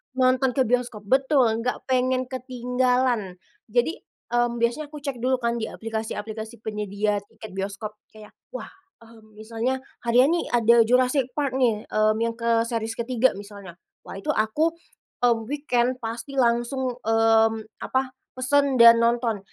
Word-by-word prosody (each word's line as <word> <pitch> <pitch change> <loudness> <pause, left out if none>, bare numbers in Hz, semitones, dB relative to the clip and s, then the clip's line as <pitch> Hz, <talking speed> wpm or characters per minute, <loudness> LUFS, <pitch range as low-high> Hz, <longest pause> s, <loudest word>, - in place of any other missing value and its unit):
nonton 255 0 +2
ke 265 - +3
bioskop 245 -3 -1
betul 265 +5 +3
enggak 230 +3 -2
pengen 255 0 +1
ketinggalan. 250 -4 0 0.3
Jadi, 245 - 0 0.3
mmm, 240 0 +1
biasanya 240 +6 -1
aku 295 -1 -11
cek 275 -4 -4
dulu 255 +2 +1
kan 235 -1 -1
di 220 - -3
aplikasi-aplikasi 220 0 -6
penyedia 210 -1 -1
tiket 220 - -12
bioskop 200 +2 -5
kayak, 215 -1 -15 0.2
"Wah, - - -7 0.3
mmm, 220 -2 -18
misalnya 230 +4 -3 0.2
harian 250 +5 +5
nih 345 - 0
ada 235 0 +4
Jurassic 255 +2 +2
Park 275 -3 -1
nih, 225 -4 +2
mmm, 215 0 +3
yang 230 0 -3
ke 230 -1 +2
series 225 -1 -3
ke-3," 245 +1 +1
misalnya. 200 -3 -10 0.3
Wah - - -8
itu 195 - -2
aku, 255 +10 +1 0.6
mmm, 230 -2 +1
weekend 255 -4 0
pasti 240 +4 -5
langsung, 240 +1 0
mmm, 225 0 +3 0.3
apa? 260 0 -1 0.2
Pesen 275 +2 +2
dan 235 -1 +8
nonton 235 -2 +1
235 Hz, 145 wpm, -24 LUFS, 220-255 Hz, 0.6 s, dan